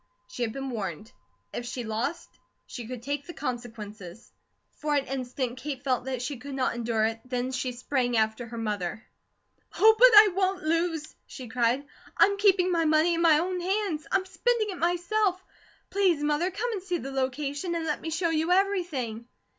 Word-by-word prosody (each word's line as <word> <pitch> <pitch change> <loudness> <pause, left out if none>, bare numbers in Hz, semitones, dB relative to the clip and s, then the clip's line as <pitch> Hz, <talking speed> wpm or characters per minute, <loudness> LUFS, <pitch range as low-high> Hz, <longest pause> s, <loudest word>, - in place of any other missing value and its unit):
She - - -8
had 230 -2 0
been 270 +2 -5
warned. 205 -2 -5 0.4
If 240 - -4
she 250 0 -4
lost, 235 +10 -4 0.3
she 240 -3 -8
could 245 -1 -7
take 285 +1 -3
the 345 - -8
consequences. 220 -6 -7 0.5
For 300 -1 0
an 280 -1 +1
instant 255 -1 -3
Kate 275 -1 -5
felt 255 -2 0
that 260 -2 -3
she 275 +1 -3
could 275 +2 -7
not 260 -1 0
endure 230 -2 0
it 225 0 -2
then 250 0 -2
she 255 0 -2
sprang 245 -1 -1
after 220 +2 0
her 235 0 -8
mother. 210 -2 -3 0.7
"Oh, 440 +2 +7
but - - +10
I 420 -1 +9
won't 380 0 0
lose!" 325 -1 -1
she 255 -3 -9
cried. 245 +3 +1 0.3
"I'm 400 0 +5
keeping 380 -3 +4
my 335 -1 +2
money 310 +2 +4
in 335 - 0
my 325 -3 +6
own 360 +3 -1
hands. 370 -4 -1
I'm 380 0 +2
spending 435 +2 0
it 365 - -7
myself. 355 +3 +1 0.5
Please, 365 -7 +2
Mother, 300 +4 +1
come 455 +6 -3
and 410 -4 -3
see 360 -2 -2
the 275 -4 -6
location, 280 +5 -2
and 330 -1 -2
let 300 - -2
me 325 - -4
show 335 +1 0
you 320 +2 +1
everything." 340 - 0
285 Hz, 185 wpm, -27 LUFS, 245-355 Hz, 0.7 s, but